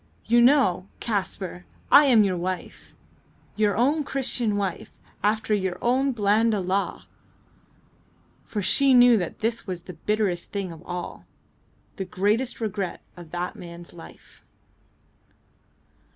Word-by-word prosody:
"You 235 Hz, +1 st, +4 dB
know, 240 Hz, -8 st, +4 dB
Kaspar, 190 Hz, -4 st, -3 dB, 0.3 s
I 295 Hz, -, +8 dB
am 240 Hz, -6 st, +6 dB
your 190 Hz, -2 st, 0 dB
wife! 180 Hz, +1 st, -5 dB, 0.6 s
your 210 Hz, -1 st, +1 dB
own 290 Hz, +6 st, +2 dB
Christian 245 Hz, -6 st, -1 dB
wife 195 Hz, -4 st, -4 dB, 0.2 s
after 215 Hz, +1 st, +1 dB
your 190 Hz, -3 st, -1 dB
own 260 Hz, +3 st, +1 dB
Blanda 215 Hz, -1 st, +2 dB
law!" 190 Hz, +2 st, -2 dB, 1.4 s
For 205 Hz, -2 st, -4 dB
she 270 Hz, +7 st, +4 dB
knew 245 Hz, -1 st, +7 dB
that 180 Hz, -4 st, -4 dB
this 230 Hz, +1 st, -1 dB
was 180 Hz, -2 st, -5 dB
the 180 Hz, -, -9 dB
bitterest 210 Hz, -5 st, 0 dB
thing 195 Hz, -3 st, -3 dB
of 160 Hz, -1 st, -11 dB
all; 175 Hz, 0 st, -6 dB, 0.7 s
the 190 Hz, -, -3 dB
greatest 210 Hz, +7 st, 0 dB
regret 210 Hz, -4 st, -3 dB
of 175 Hz, -2 st, -12 dB
that 175 Hz, +2 st, -4 dB
man's 170 Hz, 0 st, -11 dB
life. 80 Hz, -, -15 dB
205 Hz, 125 wpm, -25 LUFS, 180-235 Hz, 1.4 s, I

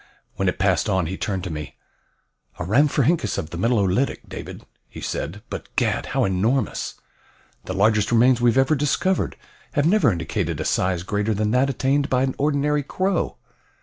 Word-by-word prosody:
When -, -, +1 dB
it -, -, -3 dB
passed -, -, +1 dB
on, 95 Hz, -2 st, +1 dB
he 90 Hz, +4 st, -3 dB
turned 95 Hz, -2 st, -3 dB
to 90 Hz, -, -4 dB
me. 75 Hz, -3 st, -7 dB, 0.8 s
"A -, -, -4 dB
rhamphorhynchus 140 Hz, -, +2 dB
of 80 Hz, -5 st, -4 dB
the 85 Hz, -, -5 dB
Middle 115 Hz, +4 st, +2 dB
Olitic, 100 Hz, +7 st, 0 dB
David," -, -, -8 dB, 0.2 s
he -, -, -10 dB
said, 95 Hz, +8 st, -4 dB
"but, -, -, -6 dB
gad, -, -, 0 dB
how -, -, +1 dB
enormous! 105 Hz, +6 st, 0 dB, 0.7 s
The 95 Hz, -, -4 dB
largest 105 Hz, +2 st, +2 dB
remains 120 Hz, +1 st, +4 dB
we 120 Hz, -, +5 dB
ever 130 Hz, +3 st, +4 dB
have 145 Hz, -, 0 dB
discovered 175 Hz, +6 st, 0 dB, 0.4 s
have 145 Hz, -1 st, +2 dB
never 180 Hz, -, +4 dB
indicated 85 Hz, -1 st, -2 dB
a 80 Hz, -, -2 dB
size 90 Hz, -2 st, 0 dB
greater 105 Hz, +3 st, -1 dB
than 105 Hz, +1 st, 0 dB
that 130 Hz, +3 st, +3 dB
attained 140 Hz, +2 st, +1 dB
by 130 Hz, 0 st, +2 dB
an 130 Hz, -1 st, 0 dB
ordinary 145 Hz, 0 st, +1 dB
crow." 185 Hz, +6 st, -1 dB
115 Hz, 180 wpm, -23 LUFS, 95-140 Hz, 0.8 s, we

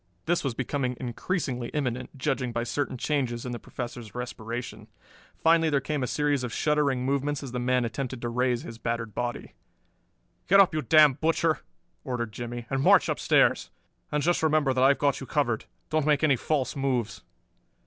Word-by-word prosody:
This 175 Hz, +1 st, +1 dB
was 135 Hz, -5 st, -2 dB
becoming 130 Hz, -1 st, -2 dB
increasingly 125 Hz, 0 st, -3 dB
imminent, 130 Hz, -2 st, -3 dB
judging 125 Hz, -1 st, -1 dB
by 120 Hz, 0 st, -2 dB
certain 135 Hz, +1 st, -2 dB
changes 125 Hz, -4 st, -1 dB
in 125 Hz, -, -4 dB
the 120 Hz, -, -5 dB
Professor's 120 Hz, -3 st, -7 dB
respiration. 120 Hz, -1 st, -6 dB, 0.6 s
Finally 165 Hz, 0 st, +5 dB
there 145 Hz, -2 st, +2 dB
came 145 Hz, +1 st, -3 dB
a 125 Hz, -, -1 dB
series 145 Hz, -2 st, 0 dB
of 125 Hz, -, -3 dB
shuddering 140 Hz, -2 st, +1 dB
movements 140 Hz, +1 st, -1 dB
as 135 Hz, -, -6 dB
the 125 Hz, -, -3 dB
man 125 Hz, 0 st, +1 dB
attempted 130 Hz, +2 st, -4 dB
to 120 Hz, -, -1 dB
raise 125 Hz, 0 st, 0 dB
his 115 Hz, 0 st, -9 dB
battered 115 Hz, -2 st, -3 dB
body. 120 Hz, +2 st, -4 dB, 0.9 s
"Get 195 Hz, -, +6 dB
up, 195 Hz, -3 st, +6 dB
you 155 Hz, -, 0 dB
damned 150 Hz, -4 st, +5 dB
butcher," 160 Hz, -1 st, +2 dB, 0.4 s
ordered 120 Hz, -5 st, -3 dB
Jimmie, 120 Hz, +1 st, -6 dB
"and 135 Hz, 0 st, 0 dB
march -, -, +5 dB
upstairs. -, -, +2 dB, 0.4 s
And 150 Hz, -1 st, 0 dB
just 175 Hz, +1 st, +2 dB
remember 155 Hz, -4 st, +2 dB
that 130 Hz, 0 st, +2 dB
I've 135 Hz, +1 st, +5 dB
got 140 Hz, -2 st, +1 dB
you 135 Hz, -, -8 dB
covered; 120 Hz, -7 st, 0 dB, 0.3 s
don't 155 Hz, -1 st, +1 dB
make 150 Hz, 0 st, +3 dB
any 145 Hz, -3 st, +5 dB
false 135 Hz, +1 st, -1 dB
moves." 125 Hz, -6 st, -1 dB
130 Hz, 180 wpm, -27 LUFS, 120-150 Hz, 0.9 s, Get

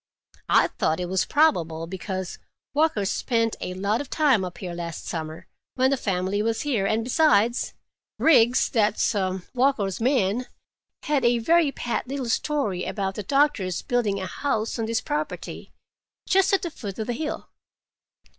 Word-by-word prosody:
I -, -, +5 dB
thought 160 Hz, -, -1 dB
it 180 Hz, -, -2 dB
was 190 Hz, 0 st, +1 dB
probable, 170 Hz, -, +2 dB
because 185 Hz, +1 st, -5 dB, 0.3 s
Walker 295 Hz, -9 st, +2 dB
spent 230 Hz, +3 st, 0 dB
a 180 Hz, -, -4 dB
lot 200 Hz, +5 st, 0 dB
of 285 Hz, -, -8 dB
time 275 Hz, -10 st, +3 dB
up 180 Hz, -1 st, -6 dB
here 180 Hz, -1 st, -6 dB
last 170 Hz, -2 st, -6 dB
summer, 160 Hz, -1 st, -5 dB, 0.3 s
when 260 Hz, +1 st, +3 dB
the -, -, +3 dB
family 195 Hz, -3 st, -1 dB
was 225 Hz, +1 st, 0 dB
here, 235 Hz, -10 st, 0 dB
and 220 Hz, +2 st, +1 dB
besides, 240 Hz, -3 st, +2 dB, 0.4 s
Riggs, 250 Hz, -6 st, +5 dB
that's 215 Hz, -1 st, +1 dB, 0.4 s
Walker's 240 Hz, -7 st, +1 dB
man, 245 Hz, -2 st, +1 dB, 0.6 s
had 295 Hz, -3 st, +1 dB
a 240 Hz, 0 st, +4 dB
very 320 Hz, +5 st, +3 dB
pat 245 Hz, -1 st, -3 dB
little 265 Hz, -2 st, -3 dB
story 225 Hz, -8 st, 0 dB
about 195 Hz, -2 st, -2 dB
the 210 Hz, -, -5 dB
doctor's 230 Hz, -7 st, +1 dB
building 230 Hz, -6 st, 0 dB
a 190 Hz, -, -3 dB
house 225 Hz, 0 st, -2 dB
on 225 Hz, -, -1 dB
this 230 Hz, 0 st, 0 dB
property, 300 Hz, 0 st, -4 dB, 0.6 s
just 385 Hz, 0 st, +3 dB
at 390 Hz, 0 st, +2 dB
the 345 Hz, -, -3 dB
foot 200 Hz, -9 st, -7 dB
of 220 Hz, -, -3 dB
the 245 Hz, -, -2 dB
hill. 300 Hz, +5 st, -4 dB
225 Hz, 160 wpm, -25 LUFS, 190-275 Hz, 0.6 s, I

